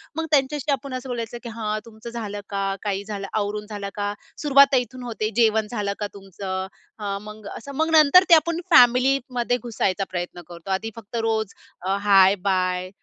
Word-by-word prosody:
मग 325 0 -2
त्यांच्याशी 285 0 +1
आपण 275 0 -3
असं 255 0 -5
बोलायचं, 235 -1 -4
की 235 - -6
"हां, 215 0 -1
तुमचं 230 +1 -10
झालं 210 -3 -5
का? 195 -1 -1 0.2
काही 200 -1 -2
झालं 200 -2 -5
आवरून 210 0 -2
झालं 200 -1 -5
का?" 205 0 -2 0.3
सुरुवात 280 -2 +6
इथून 250 0 -2
होते 220 -2 -3
"जेवण 220 -1 +3
झालं 205 -3 -2
का 205 - -2
तुमचं?" 190 -1 -5 0.3
अ, 200 -1 -3
मग 210 0 -10
असं 280 +4 -9
मग 320 +2 +1
नंतर 315 +3 +7
ते - - +8
आपण 335 +2 +1
फॅमिलीमध्ये 250 -1 +4
घुसायचा 200 -4 -1
प्रयत्न 175 -1 -5
करतो. 170 +1 -11
आधी 215 +4 -1
फक्त 230 0 -10
रोज 220 -2 -1 0.3
अ, 190 +2 0
हाय-बाय, 185 -2 +3
215 Hz, 175 wpm, -23 LUFS, 200-250 Hz, 0.3 s, ते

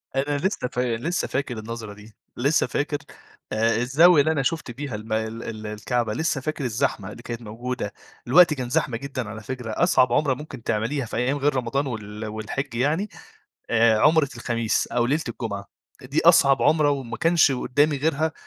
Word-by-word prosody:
أنا 145 +2 0
لسّه 170 -4 -1
فا 125 0 -2 0.2
لسّه 170 +10 -2
فاكر 130 -4 -3
النظرة 110 -1 -6
دي، 105 +1 -15 0.2
لسّه 140 +6 +2
فاكر 145 0 -1 0.6
آآ 115 +1 +2
الزاوية 145 +7 +5
اللي 155 +3 +2
أنا 145 -4 0
شُفت 150 -2 -2
بيها 135 -1 -5
الم 110 +1 -5
ال 110 +1 -2
ال 110 -1 -6
الكعبة، 110 +1 -2
لسّه 160 0 -1
فاكر 155 +1 -3
الزحمة 105 -4 -1
اللي 120 - -11
كانت 120 -1 -6
موجودة. 115 0 -5 0.3
الوقت 165 +5 +7
كان 130 -4 -4
زحمة 135 -4 0
جدًا 130 -3 -5
على 110 0 -8
فكرة، 125 0 -5
أصعب 125 -3 +3
عُمرة 140 0 +2
ممكن 135 -3 -9
تعمليها 115 +6 -1
في 115 - -5
أيام 130 +4 +1
غير 145 0 +1
رمضان 130 +3 -1
وال 105 -2 -6
والحج 110 +5 -4
يعني، 150 - 0 0.6
آآ، 115 -1 +4
عُمرة 155 +3 +4
الخميس 115 -2 0
أو 120 -1 0
ليلة 150 +5 +1
الجمعة. 110 -4 -4 0.4
دي 135 +4 -1
أصعب 140 -5 +6
عُمرة، 150 -1 +4
وما 130 -5 -3
كانش 165 0 +4
قدّامي 145 +4 +1
غيرها، 155 +2 0
125 Hz, 180 wpm, -24 LUFS, 115-145 Hz, 0.6 s, الوقت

